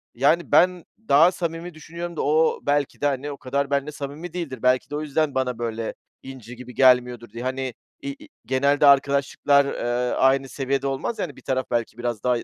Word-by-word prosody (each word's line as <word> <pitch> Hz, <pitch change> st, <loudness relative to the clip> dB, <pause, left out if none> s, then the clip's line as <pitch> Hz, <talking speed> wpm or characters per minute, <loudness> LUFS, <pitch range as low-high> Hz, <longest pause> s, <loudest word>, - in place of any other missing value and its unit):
yani 150 Hz, +7 st, +2 dB
ben 180 Hz, -1 st, +4 dB, 0.2 s
daha 160 Hz, +6 st, +6 dB
samimi 170 Hz, -1 st, -5 dB
düşünüyorum 170 Hz, +2 st, -7 dB
da -, -, -2 dB
o 155 Hz, +2 st, +2 dB
belki 145 Hz, -1 st, 0 dB
de, 145 Hz, -, 0 dB
hani, 140 Hz, +1 st, -2 dB
o 140 Hz, -, -7 dB
kadar 140 Hz, +2 st, -2 dB
benimle 140 Hz, +1 st, 0 dB
samimi 150 Hz, +4 st, -7 dB
değildir. 160 Hz, -8 st, -5 dB
Belki 125 Hz, 0 st, +2 dB
de 145 Hz, -, -5 dB
o 150 Hz, -, -2 dB
yüzden 155 Hz, -1 st, -1 dB
bana 125 Hz, -3 st, -1 dB
böyle 115 Hz, -1 st, -3 dB, 0.3 s
inci 125 Hz, -3 st, -10 dB
gibi 125 Hz, 0 st, -11 dB
gelmiyordur 125 Hz, -3 st, +3 dB
diye. 115 Hz, +3 st, -8 dB
Hani, 130 Hz, -1 st, -3 dB, 0.3 s
i 280 Hz, -, -2 dB
i -, -, -14 dB, 0.2 s
genelde 140 Hz, +3 st, +2 dB
arkadaşlıklar, 140 Hz, 0 st, +3 dB
eee, 125 Hz, -2 st, -1 dB
aynı 135 Hz, 0 st, +2 dB
seviyede 135 Hz, +1 st, -2 dB
olmaz 135 Hz, -, -3 dB
ya, -, -, 0 dB
hani, 145 Hz, -, -11 dB
bir -, -, -15 dB
taraf 130 Hz, 0 st, -1 dB
belki 115 Hz, -1 st, -1 dB
biraz 120 Hz, -3 st, -3 dB
daha 125 Hz, -1 st, +2 dB
i -, -, -6 dB
140 Hz, 205 wpm, -23 LUFS, 125-150 Hz, 0.3 s, daha